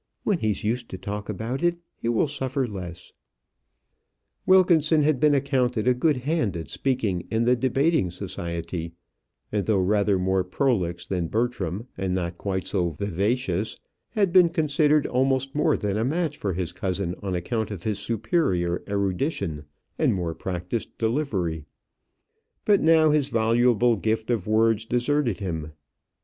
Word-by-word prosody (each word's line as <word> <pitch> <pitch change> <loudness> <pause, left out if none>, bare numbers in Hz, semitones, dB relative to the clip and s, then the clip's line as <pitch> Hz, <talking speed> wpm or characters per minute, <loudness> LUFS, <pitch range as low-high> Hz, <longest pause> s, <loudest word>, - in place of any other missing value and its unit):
"When 200 -5 +1
he's 110 -5 -1
used 120 +3 -2
to 95 - -6
talk 105 +2 -5
about 115 +7 -3
it, 175 0 +2 0.2
he 115 - -3
will 120 +6 +2
suffer 135 -1 -2
less." 90 -6 -8 1.3
Wilkinson 165 -5 +5
had 150 -3 +2
been 150 0 +4
accounted 130 -4 0
a 125 - +6
good 145 +3 +1
hand 145 - 0
at 80 - -7
speaking 110 -10 -1
in 115 +1 +1
the 125 +1 +4
debating 135 - +1
society, 85 -2 -5 0.6
and 105 -2 -1
though 110 -3 +3
rather 100 +1 +2
more 95 0 +1
prolix 90 -5 -1
than 90 -3 -2
Bertram, 110 -2 -2
and 95 -1 -1
not 85 -1 -3
quite 95 -2 -2
so 90 -4 0
vivacious, 100 - -1 0.3
had 200 -6 +1
been 180 -2 +7
considered 155 -2 +2
almost 135 +1 +1
more 150 - +2
than 105 -1 -1
a 110 - +1
match 155 +3 -1
for 100 -8 -2
his 90 -1 -3
cousin 95 -2 -2
on 95 -2 -2
account 110 +5 -2
of 100 -5 -7
his 105 -2 -1
superior 110 - 0
erudition 100 - -1 0.3
and - - +3
more 85 -3 -2
practised 90 +5 -4
delivery; 105 - -1 1.0
but 205 -2 +4
now 160 -1 +5
his 145 -2 +2
voluble 120 +1 +3
gift 110 +3 -1
of 110 -6 -1
words 110 0 +3
deserted 125 0 0
him. 80 -6 -4
110 Hz, 150 wpm, -25 LUFS, 95-135 Hz, 1.3 s, been